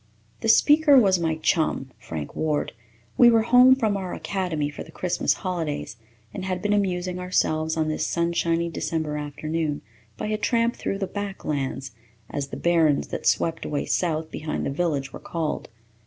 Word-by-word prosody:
The 225 - -1
speaker 295 +3 +6
was 195 -7 +5
my 160 -1 0
chum, 155 -4 0
Frank 75 -3 -6
Ward. 155 -2 -1 0.5
We 240 - +9
were 225 -1 +4
home 250 +2 +7
from 220 -6 0
our 190 -2 -4
academy 180 -7 -2
for 145 - -9
the 160 - -15
Christmas 180 +2 0
holidays 160 -10 -3 0.4
and 190 - -5
had 185 -1 -2
been 205 +2 0
amusing 180 -3 -1
ourselves 160 -3 0
on 160 -1 +1
this 155 - -1
sunshiny 170 0 0
December 160 -2 -2
afternoon 150 +1 -3 0.3
by - - -4
a 215 0 -1
tramp 235 +1 +1
through 195 - -3
the 195 - -2
"back 200 0 -6
lands," 135 -2 -2 0.4
as 140 -1 -3
the - - -7
barrens 165 -4 +2
that - - -3
swept 165 -1 +1
away 145 -1 -2
south 160 -2 -1
behind 155 0 -3
the - - -1
village 140 -3 -1
were - - -7
called. 165 -2 -3
170 Hz, 170 wpm, -24 LUFS, 155-195 Hz, 0.5 s, We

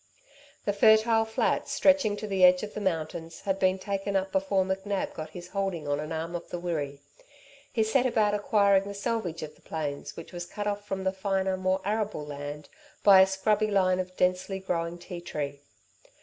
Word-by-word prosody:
The 205 - +1
fertile 220 +2 +5
flats, 220 - 0
stretching 280 -8 +3
to 215 - -5
the 195 -3 0
edge 180 +1 +7
of 210 - -6
the 210 - -5
mountains, 165 -2 -3
had 195 -1 -1
been 185 0 +3
taken 195 +1 -3
up 190 0 0
before 190 0 +2
McNab 195 +1 -2
got 155 0 -6
his 175 +2 -10
holding 190 -6 -2
on 145 0 0
an 155 +1 -5
arm 165 +1 -3
of 170 - -6
the - - -4
Wirree. 150 -5 -3 0.7
He 225 - +2
set 250 +4 +2
about 215 -4 +2
acquiring 200 -1 +3
the 200 0 -6
selvedge 200 -6 -2
of 155 0 -7
the - - -25
plains 145 -3 -5
which - - -9
was 175 0 -5
cut 205 +2 -5
off 205 0 -3
from 190 -1 -3
the 190 0 0
finer, 190 -1 0
more 185 0 0
arable 210 -6 -1
land 145 0 -7 0.4
by 195 -2 +9
a 190 - +6
scrubby 210 +3 +1
line 185 -2 +2
of 185 0 -5
densely 185 +1 +1
growing 170 -2 -2
ti 175 0 -8
tree. 145 -4 -5
190 Hz, 195 wpm, -28 LUFS, 170-205 Hz, 0.7 s, by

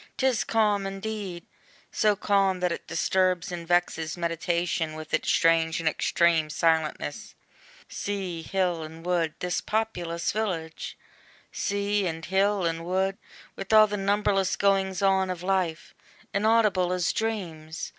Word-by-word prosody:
'Tis 260 -4 +2
calm 210 -3 +1
indeed! 195 -3 -5 0.5
so 210 -1 +2
calm, 195 -2 +2
that 180 -1 0
it - - -5
disturbs 180 +2 +1
And 170 -1 -6
vexes 175 -2 0
meditation 170 -1 -1
with 155 0 -9
its 155 - +1
strange 165 -1 +3
And 165 - -2
extreme 160 0 +2
silentness. 160 0 -1 0.5
Sea, 190 -5 -4
hill, 180 -1 -1
and 160 +1 -9
wood, 170 -3 0
This 180 0 -1
populous 175 -6 -2
village! 180 -7 -3 0.5
Sea, 200 0 0
and 165 -1 -4
hill, 195 0 +1
and 165 0 -1
wood, 190 +2 -1 0.4
With 195 +1 -6
all 215 0 +8
the 205 -1 -3
numberless 200 -1 +1
goings 195 -1 +1
on 190 -1 +3
of 180 -1 -4
life, 185 -4 -1 0.4
Inaudible 205 -4 +3
as 180 -2 0
dreams! 170 -8 -4
180 Hz, 135 wpm, -27 LUFS, 165-200 Hz, 0.5 s, all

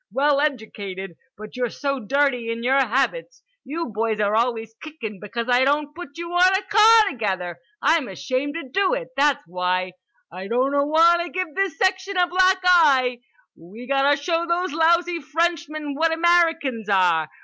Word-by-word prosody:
Well 285 +1 +2
edjucated. 205 - -4 0.2
But 215 0 -11
you're 250 -1 -2
so 275 +1 -3
dirty 250 0 0
in 230 0 -5
your 265 +3 +2
habits. 275 - -1 0.2
You 330 +2 -5
boys 220 0 -1
are 210 0 +1
always 225 -1 -1
kickin' 235 -11 -8
because 230 +4 -5
I 250 +1 +3
don't 290 +2 0
put 330 -4 -10
you 340 0 -6
on 365 +2 +4
a 405 - -5
car 430 +1 +5
together. 185 -7 -4 0.2
I'm 315 -5 +2
ashamed 255 - -3
to 330 -5 -6
do 395 - +1
it, - - -6
that's 280 0 +1
why. 180 +1 -2 0.4
I 190 +1 -8
doughtwanta 295 - +2
give 365 -4 -4
this 390 -2 -2
section 380 0 0
a 360 - +4
black 370 +1 +2
eye. 275 -9 +4 0.4
We 200 +9 -13
gotta 275 +2 +2
show 330 +3 -1
these 345 -1 -1
lousy 340 +1 +2
Frenchmen 310 -1 -2
what 320 +3 +1
Americans 325 - +1
are. 175 -5 +2
285 Hz, 160 wpm, -22 LUFS, 230-340 Hz, 0.4 s, car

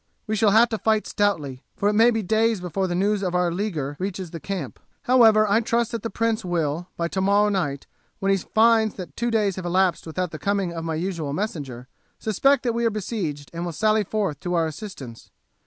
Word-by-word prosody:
We 215 - -1
shall 215 0 +3
have 225 +3 +5
to 220 -2 -3
fight 220 +1 +1
stoutly, 150 -11 -1 0.2
for 200 - +1
it 210 - +3
may 225 +3 +6
be 225 -2 -1
days 220 +2 +2
before 180 +2 -2
the 175 - -2
news 200 +2 +1
of 180 -2 -2
our 180 -1 +2
leaguer 165 -7 -3
reaches 185 -2 -4
the 165 - -6
camp. 180 -7 -5 0.2
However, 225 -4 +5
I 205 +2 +3
trust 235 0 0
that 230 -2 -3
the 230 - -3
prince 230 -1 -1
will, 170 -1 -2
by 170 - 0
tomorrow 200 +3 +2
night, 155 -9 -2 0.3
when 195 0 0
he 195 - +3
finds 220 +2 +3
that 175 -7 -8
two 240 0 -1
days 210 -5 +1
have 185 - -5
elapsed 180 -1 +1
without 180 +2 -3
the 155 - -7
coming 200 -3 -1
of 165 -1 -5
my 165 -1 -2
usual 165 -4 -3
messenger, 145 - -4 0.3
suspect 275 +6 +2
that 240 -2 0
we 235 +1 -1
are 230 - +3
besieged 190 -9 -4
and 170 +1 -4
will 175 -1 -4
sally 215 +4 +2
forth 200 -8 -2
to 175 0 -2
our 165 -1 +2
assistance. 155 - -8
195 Hz, 220 wpm, -24 LUFS, 170-220 Hz, 0.3 s, may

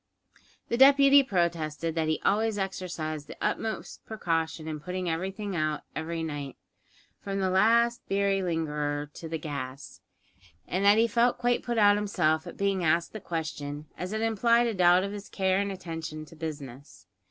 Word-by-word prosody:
The 235 - 0
deputy 275 +1 +8
protested 165 - -1
that 160 -1 0
he 155 - 0
always 215 +1 +2
exercised 170 -6 -4
the - - -10
utmost 220 -1 -3
precaution 165 -6 -2
in 155 -1 -4
putting 180 +4 -4
everything 190 +4 -3
out 155 -2 -1
every 165 +1 -3
night 145 -4 -5 0.6
from 195 0 -4
the 190 -1 +1
last 235 +5 +3
beery 195 0 +1
lingerer, 150 -4 -2
to 165 - -8
the 165 - -2
gas 140 -3 -7 0.7
and 185 +2 -1
that 205 +1 +6
he 230 +1 +4
felt 235 +2 +2
quite 245 0 +1
put 240 -1 -3
out 205 -1 +6
himself 160 -6 0
at - - -9
being 195 -2 0
asked 165 +1 +1
the 215 - -5
question, 150 -4 -5
as 180 +1 -5
it 220 0 -2
implied 230 +2 +3
a 230 - 0
doubt 180 -1 +5
of 200 - -3
his 205 0 -8
care 190 -1 +1
and 200 0 -1
attention 160 -4 -6
to 160 - -15
business. 145 -4 -8
180 Hz, 170 wpm, -28 LUFS, 155-205 Hz, 0.7 s, deputy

